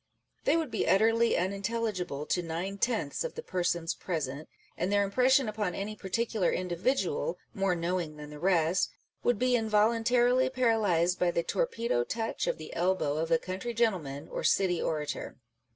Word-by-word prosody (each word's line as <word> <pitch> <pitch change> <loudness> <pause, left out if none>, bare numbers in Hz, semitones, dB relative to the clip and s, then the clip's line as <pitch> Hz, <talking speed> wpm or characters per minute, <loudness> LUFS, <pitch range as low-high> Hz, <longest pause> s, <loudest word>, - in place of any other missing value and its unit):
They 330 - +4
would 320 -6 -2
be 220 - -1
utterly 225 +5 +4
unintelligible 195 -5 -2
to 180 - 0
nine 175 +4 -4
tenths 220 - 0
of - - -5
the 470 - -6
persons 175 - -1
present, 150 -4 -4 0.3
and 180 +3 -1
their 205 0 +3
impression 255 +5 +3
upon 210 -4 -2
any 210 +2 -4
par 195 - -9
ticular 225 -3 +1
individual, 180 0 -1 0.2
more 195 -2 +1
knowing 170 -2 -2
than 150 0 -9
the 150 - -9
rest, 175 -1 +2 0.3
would 245 -2 +2
be 250 +2 +2
involuntarily 235 +3 +3
paralysed 215 -9 +2
by 180 - +3
the 170 -1 0
torpedo 235 - 0
touch 225 - -3
of - - 0
the 155 -1 -9
elbow 175 -4 +1
of 160 +1 -1
a 165 - +5
country 190 +8 -5
gentleman 165 -11 0
or - - -5
city 180 -3 +2
orator. 150 -2 -3
195 Hz, 165 wpm, -30 LUFS, 170-230 Hz, 0.3 s, a